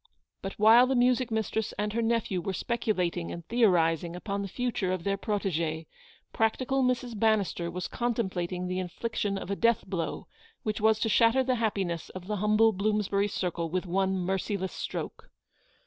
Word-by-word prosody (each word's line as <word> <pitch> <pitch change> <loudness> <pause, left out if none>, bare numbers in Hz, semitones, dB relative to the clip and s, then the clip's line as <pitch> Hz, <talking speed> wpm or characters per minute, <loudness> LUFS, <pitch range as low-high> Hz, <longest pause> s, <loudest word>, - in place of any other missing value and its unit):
But 195 - -4
while 225 +4 +6
the 265 - +1
music 250 0 +3
mistress 220 -1 -1
and 210 0 -1
her 235 - 0
nephew 225 -5 0
were 190 +3 -3
speculating 185 -6 -1
and 170 -1 -7
theorising 175 -7 +2
upon 200 +2 -3
the 200 - -3
future 220 -3 -2
of 185 -2 -2
their 195 +1 +1
protegee, 170 -6 -2 0.5
practical 255 +4 +1
Mrs. 250 -1 0
Bannister 205 -6 +1
was 180 +1 -4
contemplating 190 -7 -2
the 185 0 -2
infliction 200 +2 -2
of 195 - -5
a - - 0
death 230 +2 +2
blow 180 -3 -3 0.4
which 215 0 -2
was 220 0 +4
to - - +2
shatter 230 +4 +4
the 255 0 +1
happiness 190 -6 -1
of 185 -1 -9
the 210 +2 -2
humble 215 +2 +4
Bloomsbury 205 0 +1
circle 175 -4 -2
with 185 +3 -2
one 190 +2 +1
merciless 190 +1 -2
stroke. - - -5
200 Hz, 165 wpm, -28 LUFS, 180-225 Hz, 0.5 s, while